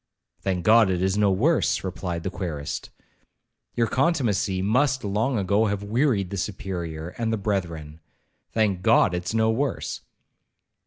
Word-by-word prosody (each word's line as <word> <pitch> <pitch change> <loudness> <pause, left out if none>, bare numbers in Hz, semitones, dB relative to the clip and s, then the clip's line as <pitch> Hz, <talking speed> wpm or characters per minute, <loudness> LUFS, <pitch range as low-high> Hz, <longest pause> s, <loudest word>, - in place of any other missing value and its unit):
'Thank 90 -3 -2
God 110 -2 +6
it 90 -2 0
is 95 0 +1
no 105 -1 +3
worse,' 120 - +2
replied 90 -2 -4
the 95 - -3
querist, 80 -7 -5 0.9
'your 115 - +2
contumacy 115 - +1
must 130 +7 +1
long 110 +5 0
ago 100 +3 +2
have 100 0 -2
wearied 110 -3 +1
the 100 - -3
Superior 85 -4 -4
and 115 -1 0
the 110 - 0
brethren—thank 90 +2 -3
God 90 - +4
it's 90 +5 -3
no 110 0 +3
worse.' 135 +3 -2
100 Hz, 140 wpm, -25 LUFS, 90-115 Hz, 0.9 s, God